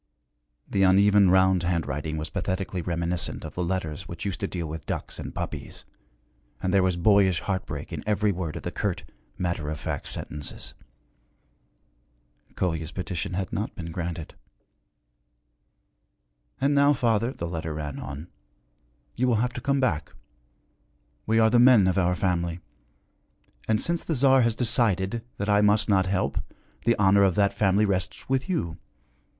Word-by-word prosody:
The 100 - 0
uneven 100 +1 +5
round 95 0 +4
handwriting 80 -3 -2
was 75 0 -4
pathetically 95 0 -2
reminiscent 85 0 -2
of - - -7
the 90 - -2
letters 90 -1 -3
which 85 +1 -7
used 100 - -3
to 100 - -1
deal 85 -3 -4
with 80 0 -7
ducks - - -4
and - - -5
puppies, - - -6 0.7
and 95 0 -1
there 100 - +5
was 90 -1 +1
boyish 95 -1 +4
heartbreak 95 -2 -4
in - - -5
every 105 0 +2
word 85 -4 -4
of - - -6
the - - -3
curt, - - -2 0.3
matter 85 -4 -2
of 80 -1 -4
fact - - -4
sentences. 75 -1 -6 1.8
Kolya's 80 -3 -2
petition 90 -1 -4
had 95 0 -3
not 105 - -3
been 85 -2 -6
granted. 85 -1 -5 2.3
'And 140 +2 +2
now, 145 +1 +5
father,' 115 -2 +1
the 85 - -5
letter 80 -2 -4
ran 75 -2 -5
on, 70 +5 -7 0.9
'you 125 - +1
will 120 - +3
have 125 +3 0
to 125 - -6
come 140 +1 +1
back. 85 - -1 1.1
We 110 +1 +2
are 110 0 +5
the 120 - +5
men 120 -5 +7
of 95 +1 +2
our 90 0 +2
family. 85 -3 -1 1.1
And, 110 -1 +2
since 170 0 -1
the 160 - -1
Tsar 135 0 +5
has 115 -2 +2
decided 115 -3 +1
that 100 - -3
I 105 0 +4
must 105 +1 +3
not 95 -2 +3
help, 95 0 0 0.5
the 115 0 +4
honor 100 0 +4
of 95 -3 +4
that 100 -1 +3
family 100 +1 +3
rests 95 0 -2
with 135 +6 0
you. 85 - -2
95 Hz, 160 wpm, -26 LUFS, 85-110 Hz, 2.3 s, men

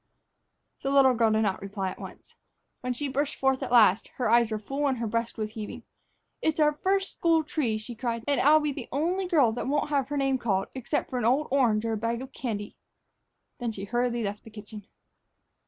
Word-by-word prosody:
The 270 - -2
little 275 -2 +5
girl 230 -2 +3
did 220 0 +2
not 195 -3 -1
reply 195 -1 -3
at - - -11
once. - - -11 0.5
When 250 - -3
she 280 +4 -3
burst 280 +2 -1
forth 265 0 +1
at 255 -2 -4
last, 220 -5 +5
her 245 -4 0
eyes 235 -1 +5
were 215 - -2
full 275 +7 -2
and 265 -2 0
her 235 - -2
breast 230 +2 -2
was 215 -1 -3
heaving. 215 -2 -7 0.6
"It's 315 0 0
our 300 -1 +4
first 385 +5 0
school 330 -2 +2
tree," 270 -8 -1
she 215 +3 -8
cried; 230 0 -3
"and 285 - +2
here 285 - +5
I'll 310 +1 +7
be 300 -1 -1
the - - -7
only 355 +7 0
girl 295 - +4
that 245 - -4
won't 290 +2 0
have 275 -3 +1
her 290 - -2
name 270 -1 +1
called, 195 -5 0
except 260 +3 -3
for 250 - -1
an 230 - -1
old 270 +6 +2
orange 230 -5 +2
or 225 - 0
a - - -1
bag 230 +3 -2
of 265 0 -11
candy." 210 -5 -4 0.8
Then 240 -2 -2
she 195 -3 -7
hurriedly 240 +2 -1
left 205 0 -4
the - - -12
kitchen. 210 -1 -11
245 Hz, 225 wpm, -27 LUFS, 220-280 Hz, 0.8 s, I'll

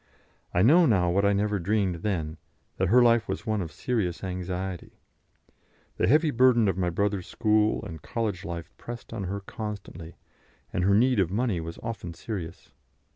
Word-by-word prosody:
I 90 - +2
know 165 +8 +6
now 90 -7 +3
what 100 +3 +2
I 100 - +4
never 105 0 0
dreamed 95 -1 0
then, 80 -4 -2 0.4
that 95 - +1
her 120 +6 +6
life 115 -1 +4
was 95 +3 -4
one 110 -3 0
of 85 - -5
serious 100 -9 -2
anxiety. 90 0 -4 1.0
The - - +2
heavy 155 +4 +4
burden 120 -3 +4
of 95 - +1
my 90 -1 0
brother's 100 +1 -1
school 110 -1 +1
and 80 -3 -8
college 100 +3 -3
life 85 -3 -6
pressed 120 -1 -8
on 100 -4 -4
her 100 +2 -4
constantly, 100 -5 -7 0.6
and 90 - 0
her 100 +1 +4
need 125 +1 +3
of 95 -4 +2
money 105 -2 0
was 85 +1 -7
often 110 -7 -5
serious. 85 -3 -7
100 Hz, 175 wpm, -27 LUFS, 90-110 Hz, 1.0 s, know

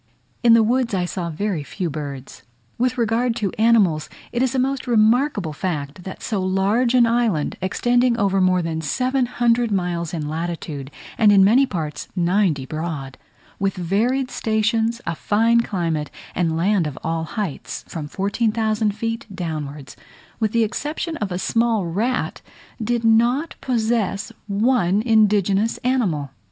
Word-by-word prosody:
In 235 -2 +6
the 230 - +5
woods 235 -1 +1
I 180 -1 0
saw 175 -1 -4
very 180 +1 -2
few 180 +5 -4
birds. 140 -3 -7 0.4
With 250 +1 +1
regard 230 +1 +1
to 210 -5 -1
animals, 205 -9 +3 0.2
it 240 - -1
is 260 0 +1
a - - +1
most 265 +1 -1
remarkable 225 - +2
fact, 150 -1 -4
that 190 - -8
so 205 -4 -1
large 200 +7 +1
an 245 -1 +6
island, 230 -9 +1
extending 240 +5 +2
over 195 -3 +2
more 185 -1 +3
than 160 -1 -2
700 240 - +1
miles 175 -4 -1
in 155 -4 -3
latitude, 155 -3 -4 0.3
and 215 -2 +6
in 195 -1 +6
many 245 +8 +5
parts 155 - -4
ninety 175 -5 +1
broad, 155 -3 -5 0.4
with 195 0 0
varied 230 +9 0
stations, 225 +1 0
a 170 - -1
fine 230 +7 +2
climate, 165 -9 -2 0.2
and 165 -2 0
land 185 -1 +2
of 145 - -7
all 165 0 -1
heights, 170 -1 -5
from 155 -3 -6
14,000 215 +3 0
feet 230 +1 -3
downwards, 150 -7 -5 0.4
with 220 -3 +1
the 230 0 +3
exception 300 +8 -3
of 205 -6 -3
a 180 - -2
small 225 +1 +1
rat, 220 +10 -1 0.4
did 235 +1 0
not 240 +8 +3
possess 225 -5 0 0.2
one 205 -2 +2
indigenous 210 -2 +3
animal. 190 - 0
205 Hz, 145 wpm, -21 LUFS, 170-235 Hz, 0.4 s, In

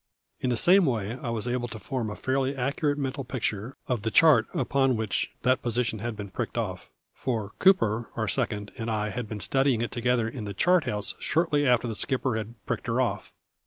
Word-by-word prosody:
In 130 - -1
the 120 - +2
same 185 +3 +5
way 115 -1 -1
I 120 - -3
was 115 0 -1
able 120 0 -1
to 115 - -7
form 115 +1 -3
a 105 - -5
fairly 135 +1 0
accurate 140 +3 0
mental 135 0 -3
picture 115 -1 -3
of 125 -4 -1
the 110 - -1
chart 145 -3 +6
upon 135 -1 +1
which 110 -3 -1
that 130 +1 +3
position 120 -2 -1
had 115 +1 -3
been 100 -2 -7
pricked - - -4
off, - - -3 0.2
for 110 -6 -3
Cooper, 115 - +3
our 110 -1 -1
"second", 105 +1 -1
and 115 0 -3
I 105 -1 -1
had 110 +1 -5
been 110 - -5
studying 135 +1 +2
it 120 - -3
together 120 -1 +1
in 115 -2 -6
the 100 -1 -5
chart 180 - +3
house 105 -1 -2
shortly 150 -2 +1
after 125 -1 +3
the 115 - -2
skipper 130 +2 -1
had 110 +1 -4
"pricked - - -3
her - - +1
off". - - -1
120 Hz, 210 wpm, -27 LUFS, 110-135 Hz, 0.2 s, chart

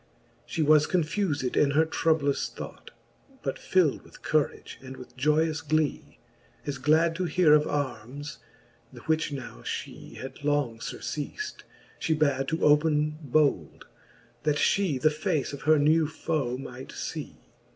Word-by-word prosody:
She 165 - -1
was 150 0 +5
confufed 160 -5 0
in 145 - +4
her 160 - +5
troublous 155 -3 +1
thought. - - -9 0.5
But 135 - -3
fild 180 -7 +2
with - - -17
courage 155 -5 -1
and 130 0 -9
with 125 - -12
joyous 150 +3 +2
glee. 155 - -1 0.5
As 140 -2 -3
glad 160 +4 +3
to 185 - -1
heare 170 -3 +4
of 150 0 +4
armes, 140 +1 -4 0.5
the - - -12
which 160 -1 0
now 130 - -7
fhe - - -6
Had 135 +2 -8
long 145 -6 0
furceaft, 155 - -5 0.4
fhe 160 -1 0
bad 140 -3 +1
to 160 - -1
open 150 0 +3
bold. 140 - +1 0.6
That 150 -1 +1
fhe 170 -3 +2
the 155 +4 +4
face 155 -3 -1
of 140 - -7
her 155 - +7
new 155 +2 +4
foe 145 -5 -2
might 135 - -8
fee. - - -6
150 Hz, 145 wpm, -27 LUFS, 140-160 Hz, 0.6 s, her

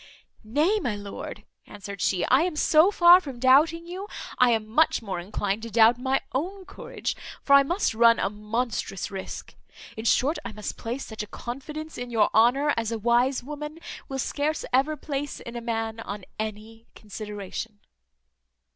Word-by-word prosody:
"Nay, 300 - +2
my 245 - -2
lord," 205 -1 -7 0.2
answered 200 -1 -8
she, 185 -3 +1
"I 260 +3 +4
am 350 -1 -1
so 310 +3 +5
far 355 -2 +7
from 275 -7 -8
doubting 300 +6 +4
you, 370 +4 -6 0.3
I 250 - +6
am 225 -2 +1
much 245 +2 +2
more 190 -4 -4
inclined 200 +3 -2
to 230 - -6
doubt 230 +2 +5
my 265 +1 +1
own 370 +8 -3
courage; - - -5 0.3
for 280 - +3
I 280 - +9
must 345 - 0
run 230 +1 +5
a - - 0
monstrous 210 -1 -3
risque. 190 -1 -7 0.4
In 220 - -7
short, 280 +7 +2
I - - -6
must 210 0 -5
place 240 +4 -5
such 220 -1 -6
a 210 - -6
confidence 300 +8 -7
in 245 0 -5
your 225 -3 +2
honour 265 +6 +4
as 230 -1 -2
a 230 - -1
wise 240 +4 +2
woman 300 +3 -7 0.3
will 270 - -3
scarce 295 +3 -1
ever 285 +4 +2
place 285 0 -4
in 235 - -9
a 235 - -4
man 225 -1 -3
on 200 -3 -6
any 220 +1 -6
consideration." 210 0 -7
240 Hz, 175 wpm, -26 LUFS, 215-295 Hz, 0.4 s, I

